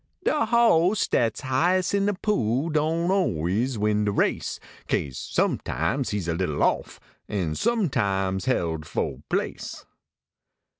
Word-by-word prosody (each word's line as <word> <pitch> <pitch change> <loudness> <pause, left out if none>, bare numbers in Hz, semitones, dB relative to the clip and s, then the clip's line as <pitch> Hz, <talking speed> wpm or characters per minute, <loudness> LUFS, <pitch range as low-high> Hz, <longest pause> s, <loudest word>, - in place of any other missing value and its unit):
I)e - - +3 0.2
boss 215 -5 +4
dat 115 -2 +1
shighes 175 +9 +1
in 200 0 +2
de 205 - +1
pool 145 - 0
Doan 160 +3 +1
always 115 - 0
win 105 0 +1
de 105 - +1
race, 100 - 0 0.3
Kase 65 -3 -1
sometimes 125 - -1
he 105 - -1
s 90 -5 -4
a 85 - 0
little 80 -4 -1
off, - - 0 0.3
An 90 -7 -1
sometimes 100 - 0
held 80 -11 -1
fo 70 0 -3
place. - - -3
120 Hz, 135 wpm, -25 LUFS, -, 0.3 s, boss